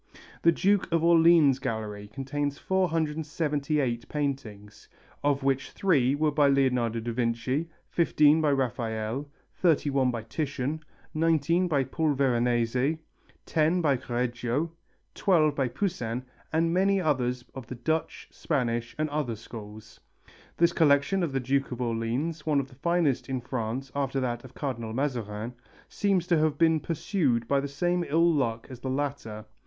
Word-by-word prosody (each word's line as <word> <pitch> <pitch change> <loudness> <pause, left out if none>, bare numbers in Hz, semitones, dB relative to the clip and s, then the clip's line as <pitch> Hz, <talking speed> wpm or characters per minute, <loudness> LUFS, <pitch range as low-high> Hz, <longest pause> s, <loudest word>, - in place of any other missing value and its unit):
The 170 - +5
Duke 195 +3 +1
of 165 -1 +2
Orleans' 165 -5 +5
gallery 105 -4 -4
includes 145 +1 -2
478 150 -7 -1
paintings, 115 -9 -4 0.3
of 145 -1 +1
which 135 0 0
three 140 -9 +2
were 155 +1 +1
by 145 -1 +4
Leonardo 125 -4 +2
da 115 +1 -4
Vinci, 125 +6 -1 0.2
15 155 -2 +4
by 150 -2 +3
Raphael, 120 0 -2 0.3
31 140 -6 +2
by 115 -3 -3
Titian, 140 +3 -3 0.3
19 165 +2 +2
by 145 -5 +2
Paul 155 +2 0
Veronese, 125 +2 +1 0.5
10 165 +3 +2
by 145 -4 +3
Correggio, 125 +5 -2 0.4
12 160 -7 +3
by 135 -2 0
Poussin, 125 - -2 0.3
and 165 +1 +1
many 195 +2 +3
others 125 -7 0
of 130 -4 -8
the 130 - -6
Dutch, 155 +7 -2
Spanish 120 -6 -2
and 155 0 0
other 145 -6 -1
schools. 110 -1 -11 0.6
This 170 0 +3
collection 150 +4 +3
of 170 -5 -1
the 135 - 0
Duke 135 +2 0
of 125 - -5
Orleans, 125 +7 -2
one 150 -3 +2
of 135 -1 -4
the - - -16
finest 170 -7 +1
in 130 -1 -1
France 125 +1 -4
after 135 -1 -1
that 120 -2 -2
of 130 -1 -13
Cardinal 115 -6 -4
Mazarin, 120 -4 -3 0.3
seems 195 -4 0
to 175 -3 +2
have 155 -1 +1
been 160 0 +4
pursued 145 - 0
by 140 +2 +2
the 140 - -3
same 175 +5 0
ill 165 +3 +3
luck 115 -6 -1
as 125 - -8
the 130 - -4
latter. 130 -6 -3
140 Hz, 150 wpm, -27 LUFS, 120-160 Hz, 0.6 s, The